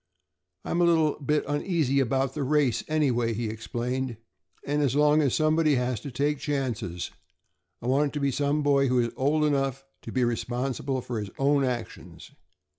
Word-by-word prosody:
"I'm 170 - 0
a - - +5
little 160 -4 +2
bit 150 +1 0
uneasy 145 -2 +1
about 135 +1 0
the 150 - -4
race, 140 -3 +1
anyway," 125 -7 +1
he 115 0 -2
explained, 120 +2 -3 0.5
"and 145 +1 0
as 140 -2 +1
long 150 +1 +4
as 140 -5 +1
somebody 155 -1 +3
has 125 -2 -1
to 140 - -7
take 145 +3 -1
chances 120 - -3 0.7
I - - -6
want 140 +3 +3
it - - -8
to 150 - -2
be 140 -1 +1
some 145 +2 0
boy 140 -1 +3
who 125 0 +1
is 120 -1 +1
old 150 +3 +2
enough 135 -2 0 0.2
to - - -8
be 130 - +1
responsible 125 +3 -2
for 120 -2 -4
his 105 -2 -5
own 140 0 +3
actions. 120 -5 -5
135 Hz, 180 wpm, -27 LUFS, 125-150 Hz, 0.7 s, a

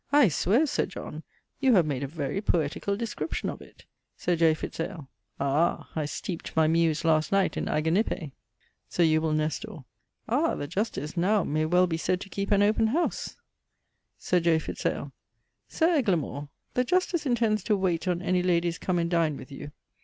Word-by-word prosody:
_ - - -53
I 270 -9 +7
swear, 205 - +2
Sir 290 - 0
John, - - -7 0.4
you 265 -4 +4
have 175 -4 +5
made 140 -4 -2
a 140 - -2
very 150 +4 -3
poetical 175 +2 0
description 230 +7 -3
of - - -10
it. - - -16 0.3
Sir 175 - 0
J. 160 -1 +4
Fitz - - -7
ale. 165 -5 -5 0.3
Ah! 140 +5 0
I 155 -2 -1
steepd 170 +3 -6
my 160 0 +4
muse 160 -1 +2
last 155 -1 +2
night 195 -1 +2
in - - -2
Aganippe. 160 0 0 0.6
Sir 175 - +2
Eubule 155 -1 +2
Nestor. 155 - -3 0.4
Ah! 290 +8 +1
the - - -4
Justice 165 - -3
now 190 +3 +2
may 155 +1 0
well 180 +2 +4
be 165 -2 -2
said 180 +2 0
to 200 - -8
keepe 200 +1 -3
an 205 -1 +4
open 215 +2 +3
howse. 320 +10 -1 0.8
Sir 180 - +1
J. 165 -1 +3
Fitz 160 - -3
ale. - - -3 0.6
Sir 335 +1 +2
Eglamour, 155 - -1 0.2
the 250 - +2
Justice 345 +1 0
intends 225 -5 +1
to 210 -3 +2
wayte 185 -2 0
on 180 0 0
any 180 0 +2
ladies 170 -2 +1
come 180 -1 -1
and 170 0 0
dine 165 -4 +1
with - - -11
you. 145 +1 -8
175 Hz, 185 wpm, -27 LUFS, 155-205 Hz, 0.8 s, I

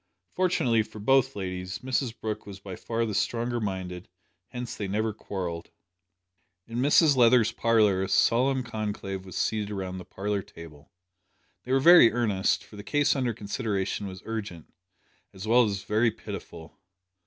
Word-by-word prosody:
Fortunately 135 -11 +2
for 110 - -9
both 135 +5 +2
ladies, 95 -1 -4
Mrs 130 -2 -2
Brooke 110 -1 -4
was 100 -1 -9
by 95 -2 -8
far 115 +3 -2
the 110 - -3
stronger 120 +3 -1
minded 95 -4 -4 0.4
hence 125 +1 -6
they 100 - -4
never 110 +3 -1
quarrelled! 90 -5 -5 1.0
In 115 +1 -5
Mrs 145 +2 +5
Leather's 120 -2 +5
parlour 110 -5 +3
a 95 - -2
solemn 130 +2 +3
conclave 105 -4 -4
was 95 - -10
seated 105 -2 -1
round 95 -2 -4
the - - -8
parlour 100 +2 -3
table. 80 -5 -14 0.7
They 125 - -5
were 135 - +4
very 170 -5 +8
earnest, 105 -5 0
for 105 - -14
the 100 - -8
case 145 +4 +2
under 130 -3 0
consideration 105 -2 -3
was 95 -1 -9
urgent, 105 -7 -6 0.6
as 95 +3 -8
well 120 +2 +5
as 100 -2 -3
very 110 +3 +2
pitiful. 100 -7 -9
105 Hz, 155 wpm, -27 LUFS, 95-120 Hz, 1.0 s, very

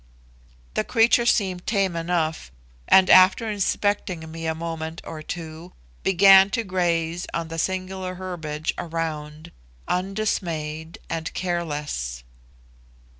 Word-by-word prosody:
The - - 0
creature 235 0 +3
seemed 185 -6 +1
tame 195 -5 +1
enough, 165 - -1 0.4
and, 190 -1 +6
after 185 +5 +6
inspecting 200 -5 -1
me 165 0 -5
a 160 - -1
moment 165 0 -5
or 155 -1 -7
two, 165 +1 -8 0.3
began 195 +1 +7
to 230 - 0
graze 175 -3 -1
on 165 -1 -3
the 165 0 -4
singular 185 +1 -3
herbiage 160 -4 -4
around 160 -1 -5 0.4
undismayed 170 -5 -2
and 165 0 -4
careless. 150 - -3
170 Hz, 110 wpm, -24 LUFS, 160-190 Hz, 0.4 s, began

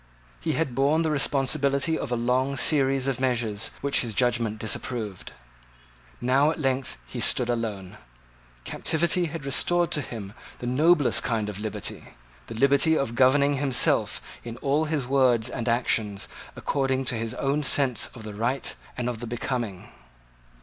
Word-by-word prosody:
He - - -1
had 160 -6 -1
borne 140 +5 +2
the 160 - 0
responsibility 140 +1 +2
of 125 - -4
a - - +2
long 130 +3 0
series 135 -3 +2
of 135 -2 -1
measures 115 -5 -1
which 140 0 +1
his 115 -4 -5
judgment 120 -3 +1
disapproved. 110 -2 -4 0.9
Now 135 +4 +3
at 160 - -3
length 135 -2 -1
he 125 - -7
stood 120 +2 +1
alone. 105 -6 -4 0.6
Captivity 170 - +1
had 160 -2 -6
restored 175 +5 +1
to 150 - +1
him 105 -6 -7 0.2
the - - -7
noblest 145 +4 +3
kind 110 -3 -1
of 100 -1 -6
liberty, 105 -1 -5 0.3
the 115 - -7
liberty 140 +5 +3
of 125 -4 -1
governing 140 +3 +4
himself 135 -2 +2 0.2
in 115 0 -7
all 145 +3 +1
his 150 -4 -1
words 125 -3 +3
and 120 -2 -3
actions 110 -4 0 0.3
according 135 -1 -1
to 120 - -1
his 115 -1 -4
own 140 +2 0
sense 135 -3 +3
of 115 - -10
the 105 -1 -7
right 120 +6 -1 0.2
and 125 -1 -2
of 120 -2 -3
the 120 - -6
becoming. 120 -5 -4
130 Hz, 155 wpm, -26 LUFS, 115-140 Hz, 0.9 s, governing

